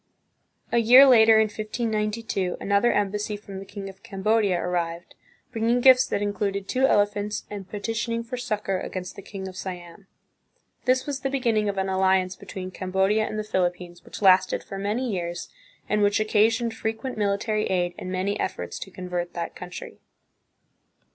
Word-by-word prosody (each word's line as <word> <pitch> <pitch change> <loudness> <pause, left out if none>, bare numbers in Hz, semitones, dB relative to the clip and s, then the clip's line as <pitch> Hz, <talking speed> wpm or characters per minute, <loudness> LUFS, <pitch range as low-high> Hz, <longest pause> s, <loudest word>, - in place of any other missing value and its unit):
A 235 - +3
year 250 +4 +8
later, 225 -4 +7
in 220 - +6
1592, 215 -2 -2
another 200 +4 +2
embassy 205 +1 -1
from 200 -2 -9
the 195 - -9
king 200 0 -8
of 195 0 -11
Cambodia 205 -3 +1
arrived, 175 -1 -3 0.4
bringing 230 +1 +1
gifts 260 0 +6
that 205 - -1
included 200 -1 -2
two 265 +1 +2
ele 205 -5 +5
phants, 205 0 -4
and 195 -2 -7
petitioning 225 +2 -2
for 240 +2 -6
succor 215 -6 -2
against 185 -1 -6
the - - -9
king 195 -1 -7
of 185 - -9
Siam. 180 +1 -8 0.8
This 255 0 +2
was 285 -2 -3
the 270 - -2
beginning 230 -6 +1
of 200 - -3
an 190 0 0
alliance 190 -1 +2
between 185 -1 -8
Cambodia 190 +4 +1
and 215 - -5
the 215 - -2
Philippines 175 -3 -2
which - - -9
lasted 185 -1 +4
for 195 - -7
many 215 +6 -1
years, 175 -5 -4 0.4
and 210 0 +1
which 205 0 +3
occasioned 225 +2 +2
frequent 225 +3 -4
military 210 +1 0
aid 175 -1 0
and 185 - -6
many 190 +2 -1
efforts 185 - -4
to - - -7
convert 180 -2 -5
that 170 -1 -4
country. 180 0 -9
205 Hz, 165 wpm, -25 LUFS, 190-225 Hz, 0.8 s, year